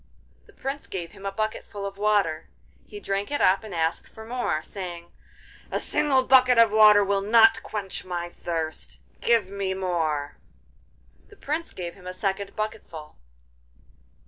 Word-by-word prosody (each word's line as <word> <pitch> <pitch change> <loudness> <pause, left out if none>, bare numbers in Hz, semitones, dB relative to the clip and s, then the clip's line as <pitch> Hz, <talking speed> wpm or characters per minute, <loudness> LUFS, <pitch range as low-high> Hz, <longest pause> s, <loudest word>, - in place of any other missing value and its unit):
The - - -19
Prince 275 +1 -5
gave 175 -3 -5
him 195 - -8
a - - -2
bucketful 210 -1 -4
of 195 0 -5
water; 200 -6 +1 0.4
he 415 - -9
drank 200 - -2
it 290 - -1
up 190 +3 +3
and 215 - -9
asked 165 -2 -1
for 220 - -12
more, 225 -10 -2
saying: 175 -3 -8 0.6
'A - - -1
single 270 -3 +2
bucket 255 -1 +5
of 230 -2 +6
water 210 -1 +7
will 200 0 0
not 225 +2 +5
quench 200 -3 -5
my 175 -1 -4
thirst; 165 -2 -5 0.2
give 225 -5 +2
me 195 -1 -2
more!' 160 -6 -2 0.9
The 410 - -17
Prince 325 -2 -4
gave 175 -2 -6
him 180 -1 -14
a 185 - -5
second 195 +1 -3
bucketful. 215 -8 -6
200 Hz, 155 wpm, -25 LUFS, 175-220 Hz, 0.9 s, water